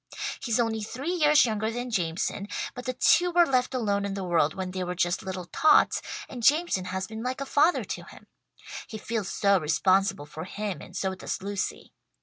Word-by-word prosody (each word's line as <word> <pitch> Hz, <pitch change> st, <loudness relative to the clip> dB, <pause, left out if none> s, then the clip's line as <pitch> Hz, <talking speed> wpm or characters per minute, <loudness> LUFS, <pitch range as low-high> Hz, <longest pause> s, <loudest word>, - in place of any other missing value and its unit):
He's 230 Hz, -1 st, 0 dB
only 225 Hz, -2 st, 0 dB
three 260 Hz, +10 st, -4 dB
years 300 Hz, -5 st, +5 dB
younger 220 Hz, -1 st, -1 dB
than 245 Hz, +2 st, -4 dB
Jameson, 185 Hz, +1 st, -1 dB, 0.3 s
but 250 Hz, -1 st, -8 dB
the 255 Hz, -, -1 dB
two 350 Hz, +7 st, +4 dB
were 345 Hz, 0 st, +5 dB
left 255 Hz, -2 st, +1 dB
alone 205 Hz, -5 st, 0 dB
in 200 Hz, -1 st, -3 dB
the 195 Hz, -, -4 dB
world 165 Hz, -4 st, +1 dB
when 185 Hz, -1 st, -4 dB
they 185 Hz, 0 st, -3 dB
were 180 Hz, 0 st, -3 dB
just 175 Hz, 0 st, 0 dB
little 185 Hz, -1 st, -5 dB
tots, 310 Hz, -, +4 dB, 0.3 s
and 250 Hz, -, -8 dB
Jameson 290 Hz, -, +3 dB
has 190 Hz, +1 st, -3 dB
been 220 Hz, +1 st, -7 dB
like 255 Hz, +2 st, -3 dB
a 275 Hz, -, -3 dB
father 305 Hz, +5 st, +3 dB
to -, -, -6 dB
him. -, -, -14 dB, 0.6 s
He 220 Hz, -, -7 dB
feels 215 Hz, -2 st, -3 dB
so 200 Hz, -1 st, +3 dB
responsible 185 Hz, +1 st, +2 dB
for 155 Hz, +2 st, -8 dB
him 205 Hz, 0 st, -4 dB
and 180 Hz, -, -9 dB
so 190 Hz, -1 st, -1 dB
does 190 Hz, -, -5 dB
Lucy. 200 Hz, -1 st, -4 dB
205 Hz, 200 wpm, -27 LUFS, 185-250 Hz, 0.6 s, years